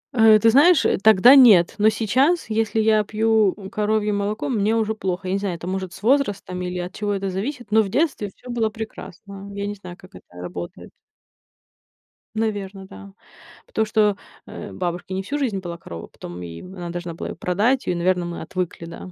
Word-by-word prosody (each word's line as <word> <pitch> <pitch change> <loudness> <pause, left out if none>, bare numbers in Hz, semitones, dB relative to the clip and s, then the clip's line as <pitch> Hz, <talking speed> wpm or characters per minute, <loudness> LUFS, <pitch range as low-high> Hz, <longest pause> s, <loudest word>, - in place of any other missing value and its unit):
Э, 220 -2 +7
ты 225 +2 +4
знаешь, 295 +4 +5
э, - - +2
тогда 220 +4 +7
нет. 210 -10 +7
Но 215 +1 +5
сейчас, 260 - +1
если 220 0 0
я 215 -1 +3
пью, 220 -1 +2
у, 195 -2 -9
коровье 210 -1 0
молоко, 205 +1 -2
мне 220 -3 +1
уже 220 -1 0
плохо. 185 -2 -4
Я 185 - -1
не 195 - 0
знаю, 195 -4 -3
это, 170 - -9
может, 190 -1 -3
с 195 +2 -13
возрастом 205 -8 0
или 180 0 -4
от 180 +1 -5
чего 205 -1 -2
это 195 0 -3
зависит, 240 +3 -5
но 220 +1 +5
в 200 - -3
детстве 270 - 0
всё 250 - -10
было 225 -2 0
прекрасно. 200 -2 -9
Я 200 0 -4
не 205 - -3
знаю, 180 -3 -11
как 185 - -17
это - - -14
работает. 90 0 -8 1.4
Наверно, 200 -3 -3
да. 95 - -12 0.5
Потому 220 - 0
что, 210 -2 +2 0.3
э, - - -8
бабушки 180 +1 -4
не 190 - -2
всю 285 +9 -3
жизнь 230 -9 -1
была 170 -2 -7
корова, 85 - -9
потом, 85 +1 -10
и 85 -1 -8
в - - -10
она 175 -1 -6
должна 175 -1 -5
была - - -6
её - - -6
продать, 215 +10 0
и, 180 - +1
наверно, 180 0 +1
мы 175 0 -6
отвыкли, 180 -2 -4
да. 170 +2 -9
200 Hz, 205 wpm, -22 LUFS, 180-220 Hz, 1.4 s, Э